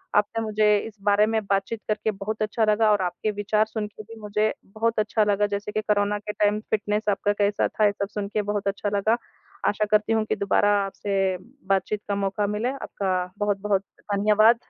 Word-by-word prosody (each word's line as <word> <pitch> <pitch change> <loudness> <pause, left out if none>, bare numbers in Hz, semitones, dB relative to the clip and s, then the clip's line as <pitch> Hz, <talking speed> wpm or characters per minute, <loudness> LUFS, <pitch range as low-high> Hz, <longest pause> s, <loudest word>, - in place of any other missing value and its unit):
आपने 210 +2 +2
मुझे 210 -1 +3
इस 215 - -12
बारे 205 +1 +4
में 220 0 +1
बातचीत 195 +3 -1
करके 215 0 0
बहुत 210 +2 -5
अच्छा 215 +1 +1
लगा 215 +1 +4
और 205 -2 +3
आपके 180 +4 -1
विचार 210 +1 +1
सुनके 215 -1 -5
भी 225 +2 -12
मुझे 210 +1 0 0.2
बहुत 225 0 +1
अच्छा 215 0 +2
लगा 205 0 +2
जैसे 205 +1 -4
कि 215 - -1
कोरोना 205 -1 +1
के 210 0 -5
टाइम 210 0 +2
फ़िटनेस 210 0 0
आपका 205 0 +1
कैसा 205 0 +1
था 215 - +1
ये 205 - +5
सब 200 0 -3
सुनके 210 0 -2
बहुत 205 0 -2
अच्छा 200 +1 -1
लगा। 220 +4 +2 0.5
आशा 210 +1 +1
करती 215 +1 +3
हूँ 220 -1 +2
कि - - -1
दोबारा 200 +1 +2 0.2
आपसे 195 -1 -1 0.3
बातचीत 195 +2 0
का 200 - 0
मौका 200 +1 0
मिले। 210 +4 -1
आपका 190 -9 -2
बहुत-बहुत 205 -1 +1 0.2
धन्यवाद। 210 +3 +4
210 Hz, 190 wpm, -25 LUFS, 200-215 Hz, 0.5 s, ये